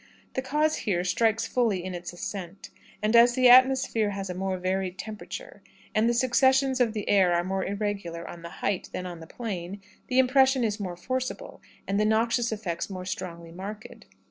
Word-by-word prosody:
The 260 - -1
cause 300 +4 +1
here 180 -4 -1
strikes 220 +5 +1
fully 220 -8 0
in 185 0 -5
its 175 0 -6
ascent; 180 +1 -7 0.3
and 215 +2 +2
as 240 +1 +7
the 255 -1 +5
atmosphere 255 -4 +5
has 195 -2 -4
a - - -3
more 190 +1 -2
varied 185 0 -2
temperature, 220 - -8 0.3
and 220 +2 +3
the - - +2
succussions 260 +2 +3
of 230 -3 +2
the 210 -2 -4
air 190 -3 +4
are 170 - +1
more 190 +1 -2
irregular 200 -5 -3
on 170 - -9
the 170 - -8 0.2
height 200 -2 -1
than 185 - -4
on 175 -2 -7
the 160 - -11
plain, 195 -3 -5 0.3
the 255 - -1
impression 260 0 +4
is 215 -1 -1
more 180 -3 -5
forcible, 255 +7 -4 0.3
and 200 +1 0
the 210 - +3
noxious 230 +2 +2
effect 205 -6 -3
more 185 -2 -6
strongly 170 -3 -6
marked. 200 +5 -9
205 Hz, 190 wpm, -27 LUFS, 185-240 Hz, 0.3 s, as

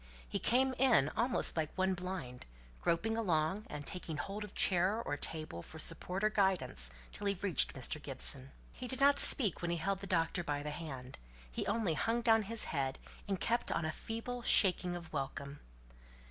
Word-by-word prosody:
He - - -3
came 260 +2 +2
in 235 - +4
almost 245 +6 +1
like 155 -2 -1
one 190 0 +2
blind, 180 - -6 0.3
groping 225 +7 0
along, 190 -2 0
and 145 -1 -6
taking 165 -3 -4
hold 200 +7 -4
of 210 - -10
chair 190 +4 +3
or 145 - -3
table 155 - -4
for 160 - -12
support 180 +5 -3
or 215 - +3
guidance 180 - +1 0.2
till 205 - -4
he 200 - +1
reached 190 -2 +3
Mr. 135 +3 -1
Gibson. 135 -1 -1 0.2
He 250 - -8
did 260 +1 -2
not 280 +1 +5
speak 215 - +7
when 175 - -2
he 170 - 0
held 195 +4 -1
the 195 - -8
doctor 170 0 0
by 145 -2 -3
the 150 - -4
hand; 135 - -8 0.3
he - - -3
only 220 -8 0
hung 230 +8 0
down 225 -1 +5
his 220 +2 0
head, 135 -3 -2 0.3
and 195 -2 -1
kept 235 +6 0
on 170 - -1
a 155 - -1
feeble 230 +7 -5
shaking 180 -5 +3
of 170 -2 -9
welcome. 140 0 -5
180 Hz, 190 wpm, -34 LUFS, 150-215 Hz, 0.3 s, speak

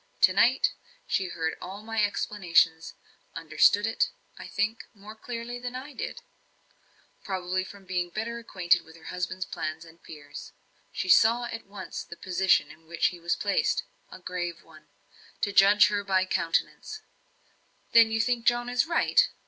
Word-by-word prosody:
To 185 - +6
night, 240 +6 +3 0.3
she 190 - 0
heard 160 -2 -2
all 195 +3 -8
my 225 -1 0
explanation; 175 -5 +2 0.5
understood 205 +1 +3
it, 225 - +1 0.3
I - - -10
think, 210 +3 -2
more 205 +1 -11
clearly 240 +1 -6
than 245 0 -6
I 270 +3 -7
did 480 - -6 1.0
probably 185 -1 -2
from 195 0 -12
being 180 -1 -2
better 230 +5 -4
acquainted 185 -6 +1
with 160 0 -17
her 165 - -17
husband's 185 +1 -3
plans 155 -2 -5
and 165 +1 -17
fears. 145 -2 -11 0.4
She - - -4
saw 230 +5 +5
at 230 -2 -6
once 195 -1 -7
the 170 - -11
position 185 -5 +2
in 160 +1 -18
which 170 0 +1
he 175 - -11
was 170 0 0
placed; 200 -1 0 0.3
a - - -9
grave 175 -2 -5
one, - - -18 0.5
to 200 - 0
judge 200 +1 +7 0.2
by 190 -1 +3
her - - -8
countenance. 185 - -2 0.9
"Then 230 -1 +7
you 220 0 -1
think 235 +1 0
John 240 0 +2
is 250 +6 +1
right?" 420 +8 +3
195 Hz, 160 wpm, -27 LUFS, 175-230 Hz, 1.0 s, judge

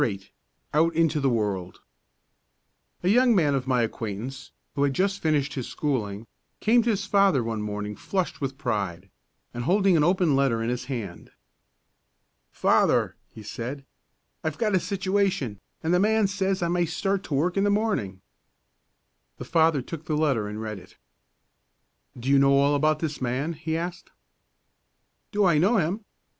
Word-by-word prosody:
VIII 100 -3 -2 0.4
OUT 165 +2 +3
INTO 160 -2 +2
THE 135 -1 +2
WORLD 100 -6 -2 1.2
A - - 0
young 245 +2 +5
man 150 -6 +3
of 135 -1 -1
my 125 -2 +2
acquaintance, 115 +3 -5 0.2
who 140 - -2
had 140 -1 +2
just 195 +1 0
finished 150 -3 +1
his 130 -3 -4
schooling, 110 -8 -2 0.3
came 235 +2 +4
to 235 - -1
his 200 -3 0
father 195 - +3
one 115 -1 -3
morning, 105 0 -4
flushed 185 - -3
with 135 -1 -3
pride, 100 - -3 0.4
and 120 0 -4
holding 195 +2 +3
an 155 - +4
open 175 -3 +3
letter 130 -5 +1
in 115 - -1
his 125 0 -3
hand. 115 -9 -6 1.2
"Father," - - +2
he 110 - -12
said, 130 +6 -6 0.6
"I've 155 -1 -2
got 215 -3 0
a 185 - +4
situation, 190 - -1 0.2
and 165 +2 +1
the 180 - +4
man 215 +2 +3
says 195 -1 -1
I - - +1
may 175 0 +1
start 195 +4 -1
to 145 - -2
work 175 +6 +1
in 195 - +2
the 205 - +3
morning." 200 - -1 1.2
The - - -7
father 160 -4 +2
took 160 +2 -8
the 155 -3 -1
letter 135 -9 +1
and 105 +1 -6
read 110 -2 -5
it. 90 - -18 1.2
"Do 120 - -7
you 140 0 +5
know 140 0 +5
all 140 +1 +3
about 155 +2 +2
this 155 -4 -3
man?" 130 +6 -1
he 160 +1 -3
asked. 170 +1 -5 1.2
"Do 205 -2 +2
I 170 -5 +4
know 205 +8 +3
him? 190 +4 -1
150 Hz, 170 wpm, -26 LUFS, 120-185 Hz, 1.2 s, young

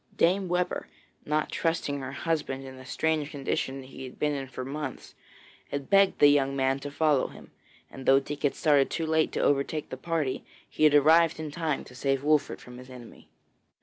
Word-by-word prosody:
Dame 185 +3 +2
Webber, 180 0 -1 0.4
not 150 +1 0
trusting 160 -4 -1
her 130 -1 -6
husband 140 -3 -2
in 130 0 -9
the 130 - -12
strange 155 +1 0
condition 135 -2 -3
he 130 0 -10
had 130 - -11
been 150 0 0
in 135 -2 -4
for 130 0 -6
months, 140 0 -6 0.6
had 140 +3 -5
begged 195 -1 +5
the - - +6
young 140 -1 +2
man 135 0 +1
to 145 - -6
follow 145 -1 +2
him, - - -14 0.4
and 135 - -10
though 135 0 +7
Dick 145 +1 -7
had 145 - +1
started 145 -3 +3
too 165 - -2
late 160 0 +2
to - - -1
overtake 145 +2 0
the 130 - -5
party, 155 -2 -2 0.2
he 155 - +1
had 150 -1 +5
arrived 160 +3 +5
in 155 -2 -5
time 155 -2 -2
to - - -14
save 135 +1 -1
Wolfert 150 0 +1
from 125 0 -12
his 125 +1 -12
enemy. 125 -2 -13
145 Hz, 200 wpm, -28 LUFS, 135-155 Hz, 0.6 s, though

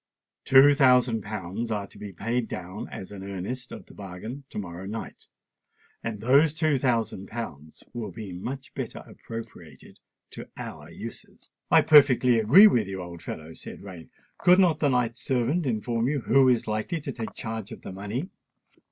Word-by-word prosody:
Two 135 +2 +7
thousand 125 -5 +4
pounds 105 +2 -5
are 105 -2 -2
to - - -16
be 105 -1 -7
paid 115 +6 -2
down 95 +3 -6
as 95 - -8
an 100 -2 -8
earnest 100 +7 -5
of - - -9
the - - -16
bargain 105 +8 -8
to - - -9
morrow 95 -2 -6
night; 110 +2 -7 0.8
and 115 -2 -4
those 140 +6 +4
two 155 -4 +2
thousand 115 -6 0
pounds 80 -10 -8
will 115 -3 -4
be 105 -5 -8
much 130 +9 -6
better - - -6
appropriated 85 - -10 0.3
to - - -9
our - - -8
uses." - - -11 0.2
"I - - +6
perfectly 130 -5 +6
agree 140 - +8
with 120 - +4
you, 95 -1 -5
old 85 -1 -8
fellow," 80 +1 -7
said - - -10
Rain. 90 -5 -10 0.3
"Could 180 +1 +6
not 175 -5 +4
the 145 - +2
knight's 125 -2 0
servant 135 +6 0
inform 115 0 -1
you 140 -1 0
who 130 +4 +4
is 120 -2 +2
likely 110 +10 -2
to 140 -2 -5
take 115 -4 -6
charge 110 -2 -6
of - - -10
the - - -7
money?" 105 - -5
115 Hz, 175 wpm, -26 LUFS, 100-130 Hz, 0.8 s, agree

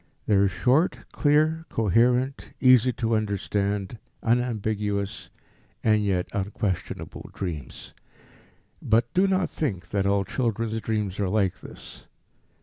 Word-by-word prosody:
They 105 - +1
are 100 0 +5
short, 130 - +2
clear, 155 +2 +2
coherent, 125 +5 +1
easy 125 -1 +6
to 115 0 0
understand, 100 0 -1 0.2
unambiguous, 110 -4 -1 0.5
and 110 -1 +3
yet 95 -3 0
unquestionable 95 -3 -3
dreams. 80 -9 -6 0.9
But 115 +2 +2
do 190 +2 +4
not 190 -1 +1
think 95 - -3
that 100 -1 0
all 100 0 +2
children's 115 -1 -1
dreams 105 -4 -2
are 100 -2 0
like 95 -2 0
this. - - -11
110 Hz, 115 wpm, -25 LUFS, 100-125 Hz, 0.9 s, easy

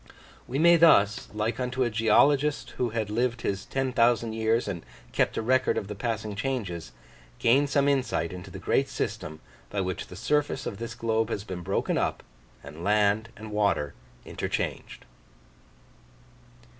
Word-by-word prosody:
We 130 - -3
may 170 +3 +6
thus, 110 -11 +5
like 110 +3 -2
unto 125 +1 0
a 120 - 0
geologist 135 +7 +3
who 125 - 0
had 110 -2 -3
lived 120 0 0
his 100 0 -2
ten 135 -1 -2
thousand 115 -2 +3
years 110 +1 +1
and 90 -5 -4 0.3
kept - - +1
a - - -1
record 130 +3 +2
of 100 - -2
the 105 - -5
passing 110 -1 -3
changes, 100 - -3 0.5
gain 135 +5 +4
some 140 0 +2
insight 130 -11 0
into 90 +2 -8
the - - -8
great - - +1
system 80 0 -4 0.3
by 100 - -1
which 95 -1 -3
the - - -10
surface 145 +5 0
of 100 - -5
this 115 0 -5
globe 115 -1 0
has 100 -3 -3
been 95 -4 -6
broken 95 +3 0
up, - - -1 0.4
and 75 +4 -9
land 105 +2 +2
and 110 0 -9
water 100 -9 +1 0.3
interchanged. - - -4
110 Hz, 160 wpm, -27 LUFS, 100-125 Hz, 0.5 s, may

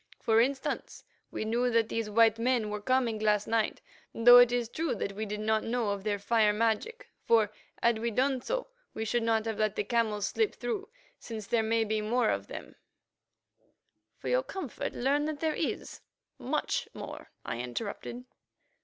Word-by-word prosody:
For 225 0 +4
instance, 265 +2 -2 0.3
we - - -4
knew 240 +3 +1
that 230 -2 +2
these 225 -2 -2
white 225 +1 +4
men 235 -3 +1
were 210 0 -4
coming 240 -1 +1
last 210 -1 +2
night, 225 -1 0 0.3
though 245 +2 +9
it 245 -1 +6
is 245 -1 0
true 300 +1 -2
that 200 - -3
we 215 +2 -4
did 210 +1 -4
not 220 0 +1
know 230 -2 -1
of 200 -1 -4
their 205 -1 0
fire 210 +1 +3
magic, 230 - -1 0.2
for, 220 -3 +3 0.3
had 235 -1 +3
we 235 +1 -1
done 260 +3 +1
so, - - -2 0.3
we 220 - -3
should 240 +2 0
not 225 -1 +1
have 220 -1 -3
let 215 -1 +1
the - - 0
camels 220 -4 0
slip 440 -2 0
through, 425 -2 -4 0.3
since 220 -3 -7
there 230 +2 +1
may 225 +1 +1
be 215 0 -1
more 230 +2 +1
of - - -3
it - - -7
on - - -5
them——" - - -18 1.4
"For - - -8
your - - +3
comfort, 380 - -5
learn 280 +4 +1
that 305 -1 -3
there 315 0 0
is—much 285 -9 -4
more," - - -8 0.2
I 120 - -4
interrupted. 200 - -5
230 Hz, 185 wpm, -30 LUFS, 215-250 Hz, 1.4 s, though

